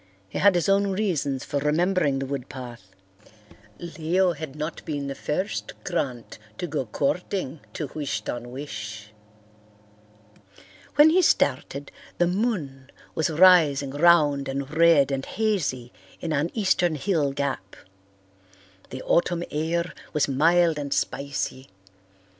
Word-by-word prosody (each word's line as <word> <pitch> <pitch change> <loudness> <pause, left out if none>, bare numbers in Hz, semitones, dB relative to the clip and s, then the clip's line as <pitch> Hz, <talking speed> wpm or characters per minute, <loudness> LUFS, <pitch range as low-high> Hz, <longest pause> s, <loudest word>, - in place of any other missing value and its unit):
He 95 - -5
had 200 -2 +5
his 175 - +1
own 200 +1 +3
reasons 170 -9 -1
for 145 - -2
remembering 155 0 +1
the 135 - -2
wood 135 -2 -5
path. 120 -8 -10 0.8
Leo 170 +2 0
had 150 -3 -7
not 155 +2 -5
been 145 -3 -3
the 140 - -3
first 150 +8 -3
Grant 130 -12 -3 0.2
to - - -3
go 145 -6 -3
courting 155 - -2
to 155 - -3
Wish 150 -3 -3
ton 120 0 -5
wish. 105 -6 -7 1.8
When 295 +2 +7
he 370 +3 +4
started, 140 - +1 0.3
the 175 - +3
moon 175 - -2 0.2
was 160 - 0
rising 155 -5 +5
round 145 -3 +4
and 140 +2 -4
red 160 -4 +5
and 135 -1 -2
hazy 160 - -2 0.3
in 165 -2 -3
an 150 +3 0
eastern 180 -6 +2
hill 150 -2 0
gap. 135 -9 -3 1.1
The 130 - -7
autumn 175 0 +1
air 170 +3 -1 0.2
was 150 - +2
mild 165 +3 +3
and 140 -1 -5
spicy. 135 -2 -2
150 Hz, 130 wpm, -25 LUFS, 135-175 Hz, 1.8 s, When